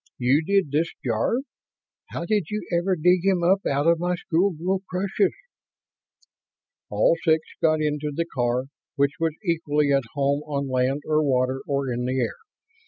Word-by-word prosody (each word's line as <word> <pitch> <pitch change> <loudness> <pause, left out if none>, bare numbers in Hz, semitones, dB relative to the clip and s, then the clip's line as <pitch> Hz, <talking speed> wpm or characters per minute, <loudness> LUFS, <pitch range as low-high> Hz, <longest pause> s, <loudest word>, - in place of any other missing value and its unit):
You 130 +5 +3
did 195 -4 +1
this, 160 +3 +1
Jarve. 120 - 0 0.7
How - - -4
did 210 -2 +1
you 210 -4 -4
ever 185 +2 +1
dig 180 +2 +3
him 190 -3 +2
up 190 +3 +3
out 140 +1 0
of 170 0 +4
my 180 +1 0
schoolgirl 180 +2 0
crushes?" 190 - 0 1.5
All - - +3
six 160 -1 +2
got 155 -1 +3
into 150 0 -1
the 170 +4 -2
car, 125 -1 0 0.3
which 140 +2 0
was 165 -2 0
equally 150 -4 +1
at 135 - +3
home 140 0 +1
on 140 -2 -2
land 130 +2 0
or 155 0 +2
water 130 -1 +1
or 140 -3 -1
in 120 +1 -2
the 130 +1 -1
air. 120 - -2
155 Hz, 165 wpm, -24 LUFS, 140-180 Hz, 1.5 s, of